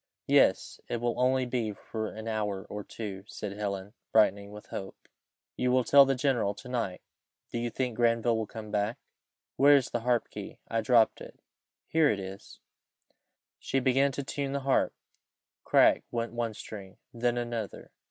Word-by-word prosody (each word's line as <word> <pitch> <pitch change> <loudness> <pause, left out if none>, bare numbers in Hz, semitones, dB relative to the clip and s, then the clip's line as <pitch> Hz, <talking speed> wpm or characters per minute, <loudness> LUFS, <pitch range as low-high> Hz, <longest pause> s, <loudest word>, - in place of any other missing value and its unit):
"Yes, - - +3
it 120 - -2
will 120 0 0
only 130 +1 +3
be 120 -4 -2
for 110 +2 -5
an 110 +1 -7
hour 105 -3 -2
or 105 0 -5
two," 100 -4 -7
said 105 -1 -6
Helen, 100 -1 -4 0.2
brightening 100 -2 +3
with 105 0 -10
hope. 95 - -7 0.5
"You 125 0 +1
will 130 0 +3
tell 140 +2 +7
the 135 0 +1
general 120 -7 +1
to 125 - -11
night 115 -7 -3 0.5
Do 120 - -2
you 120 0 -1
think 125 -1 -3
Granville 115 0 +3
will 110 -1 -2
come 110 -2 -8
back? 105 +2 0 0.6
Where 145 +1 +7
is 135 -3 +1
the 120 - 0
harp 120 0 0
key? - - -8
I 115 0 0
dropped 115 0 +3
it - - -11 0.5
here 160 -2 +3
it 105 - 0
is." 95 +1 -9 1.0
She 135 - 0
began 135 +2 +3
to 140 - -3
tune 140 0 -3
the 140 - -1
harp. 135 0 +1 0.7
Crack - - +5
went 115 0 -3
one 115 -2 -2
string 100 -3 -9 0.2
then 120 0 0
another. 120 -3 -4
115 Hz, 170 wpm, -29 LUFS, 105-125 Hz, 1.0 s, tell